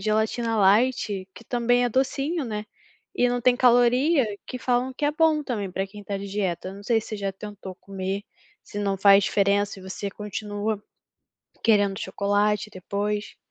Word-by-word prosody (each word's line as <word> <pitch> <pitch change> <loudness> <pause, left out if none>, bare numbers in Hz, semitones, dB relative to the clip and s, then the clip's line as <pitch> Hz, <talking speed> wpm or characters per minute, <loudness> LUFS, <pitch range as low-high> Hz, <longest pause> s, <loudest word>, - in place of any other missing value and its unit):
gelatina 220 +2 0
light 205 -1 +2
que 230 - -13
também 245 +1 +2
é - - +2
docinho, 275 +6 0
né, 215 -2 -4 0.5
e 245 - +3
não 245 0 0
tem 245 0 +4
caloria 250 +4 +4 0.2
que 255 - -5
falam 250 +1 0
que 275 - -4
é 290 - +3
bom 310 -1 +3
também 215 -9 -3
pra 190 +1 -2
quem 205 +1 -11
tá 200 0 -3
de 200 - -6
dieta, 190 -3 -2
eu 190 - -8
não 200 - -11
sei 225 +2 +2
se - - -11
você 215 - -4
já 200 -1 -3
tentou 195 -1 -9
comer, 195 0 -4 0.4
se 205 - -8
não 200 -1 0
faz 195 0 +6
diferença 200 0 +1
e - - -12
você 190 +2 -5
continua 210 +1 -4 0.8
querendo 205 -3 +3
chocolate 205 +2 0
depois. 205 +2 -3
210 Hz, 180 wpm, -25 LUFS, 200-245 Hz, 0.8 s, faz